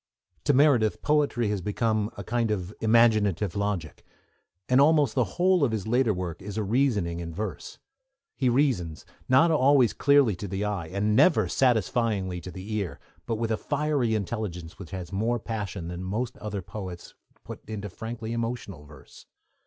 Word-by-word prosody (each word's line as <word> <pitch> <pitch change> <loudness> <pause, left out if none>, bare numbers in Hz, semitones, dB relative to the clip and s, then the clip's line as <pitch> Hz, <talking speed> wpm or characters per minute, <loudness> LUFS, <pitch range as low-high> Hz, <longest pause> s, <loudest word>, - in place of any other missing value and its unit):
To 145 - +4
Meredith 130 -7 +3
poetry 145 -7 +1
has 105 -2 -1
come 110 -3 +1
to - - -27
be - - -6
a - - -8
kind 115 -1 0
of 100 -2 -3
imaginative 110 -4 +3
logic, 100 -7 -3 0.6
and 130 +2 +5
almost 145 -4 +4
the 125 - +2
whole 180 -2 +3
of 130 - +2
his 110 -4 -3
later 120 +1 +2
work 90 -3 -4
is 100 +2 -7
a 110 - 0
reasoning 105 -7 +1
in 85 -1 -5
verse. 100 -7 -5 0.6
He 130 -3 +1
reasons, 120 - 0 0.2
not 135 +6 +5
always 135 -5 +4
clearly 140 -7 +4
to 100 - -5
the 95 +2 -3
eye, 100 -6 -3
and 100 +4 0
never 180 +8 +4
satisfyingly 110 -6 +1
to 90 - -8
the 95 +4 -7
ear, 100 -5 -4 0.3
but 115 - 0
with 115 0 -2
a 110 - +1
fiery 145 -6 0
intelligence 95 -5 -4
which 95 - -9
has 95 -2 -7
more 115 +5 0
passion 100 -6 -5
than 90 +1 -6
most 110 +6 -3
other 105 -3 -5
poets 90 -1 -8 0.3
put - - -9
into 105 -2 -4
frankly 115 +3 -6
emotional 115 -9 -4
verse. 75 -2 -16
110 Hz, 175 wpm, -27 LUFS, 95-120 Hz, 0.6 s, and